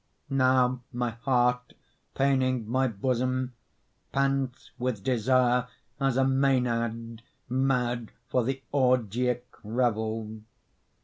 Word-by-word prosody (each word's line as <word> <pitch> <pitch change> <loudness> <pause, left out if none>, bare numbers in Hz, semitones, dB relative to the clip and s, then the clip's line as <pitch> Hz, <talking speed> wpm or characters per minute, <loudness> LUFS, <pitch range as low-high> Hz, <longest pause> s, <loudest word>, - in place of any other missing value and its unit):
Now 130 -2 +3
my 120 -1 -1
heart, 125 +1 0 0.4
paining 130 -4 +1
my 130 +3 +2
bosom, 130 +3 -1 0.6
Pants 135 -2 -1
with 120 -5 -2
desire 125 0 +2 0.3
as 135 -2 +1
a 135 - +4
mænad 120 -4 +1 0.3
Mad 125 -3 0 0.2
for 125 0 +1
the 135 +2 -3
orgiac 125 -2 +2 0.2
revel. 110 -1 -1
125 Hz, 90 wpm, -28 LUFS, 115-130 Hz, 0.6 s, a